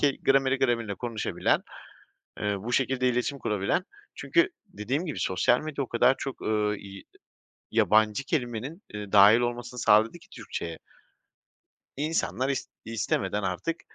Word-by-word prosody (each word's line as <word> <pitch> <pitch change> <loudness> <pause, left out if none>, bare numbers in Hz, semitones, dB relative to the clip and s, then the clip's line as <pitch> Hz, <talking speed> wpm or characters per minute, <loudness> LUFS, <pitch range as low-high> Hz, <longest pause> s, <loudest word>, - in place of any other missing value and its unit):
ke 140 -2 +2
grameri 135 0 +3
gramerine 120 -5 0
konuşabilen, 115 -1 -1 0.8
eee, 105 0 0
bu 115 +5 -4
şekilde 130 -1 +1
iletişim 125 +3 -1
kurabilen 105 - 0 0.3
çünkü 345 +3 +2 0.2
dediğim 140 - -3
gibi 155 - -4
sosyal 95 +6 +2
medya 150 -2 -3
o - - -7
kadar 120 +3 +3
çok, 135 -2 -6
ııı, 105 -1 0
i 100 -1 -11 0.7
yabancı 110 +4 +3
kelimenin, 135 - -3
ııı, 105 -1 -6
dâhil 105 +3 +8
olmasını 120 0 -3
sağladı 110 +9 +4
ki - - -21
Türkçeye 85 -1 -6 1.2
insanlar 140 - -1
is 135 -2 -2 0.2
istemeden 105 -3 -1
artık 95 - -2
120 Hz, 135 wpm, -27 LUFS, 105-135 Hz, 1.2 s, dâhil